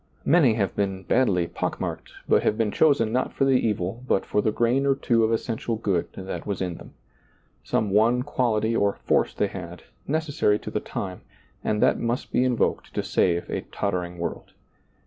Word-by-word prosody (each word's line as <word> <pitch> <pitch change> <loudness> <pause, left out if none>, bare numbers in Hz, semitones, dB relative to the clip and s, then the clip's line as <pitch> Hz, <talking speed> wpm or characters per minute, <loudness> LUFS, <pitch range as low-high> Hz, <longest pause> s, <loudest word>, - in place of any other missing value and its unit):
Many 145 -9 +5
have 100 -4 -1
been 95 -2 -1
badly 95 -4 +2
pock - - -3
marked, - - -5
but - - +4
have 110 - +1
been 110 -2 +1
chosen 140 -7 +3
not 125 +2 0
for 135 - +1
the 135 - +3
evil 110 -3 0
but 95 - +1
for 105 - +1
the 110 - +1
grain 120 +5 +1
or 135 - +4
two 120 -4 +2
of 110 - +2
essential 115 0 -1
good 100 -6 -1
that 95 +2 -6
was 100 -2 -2
in 90 -2 -3
them. - - -14 0.7
Some 105 -2 0
one 115 +5 +3
quality 115 -5 0
or 100 -2 +2
force - - 0
they - - +1
had, 90 -3 -7 0.2
necessary 145 -8 +1
to - - -8
the - - -1
time, 95 -2 -5 0.4
and 105 0 +1
that - - +3
must 120 +1 -2
be 125 - +2
invoked 125 -2 0
to - - 0
save 85 -1 +1
a - - -3
tottering 90 -3 -2
world. 85 - -5
110 Hz, 190 wpm, -25 LUFS, 95-125 Hz, 0.7 s, Many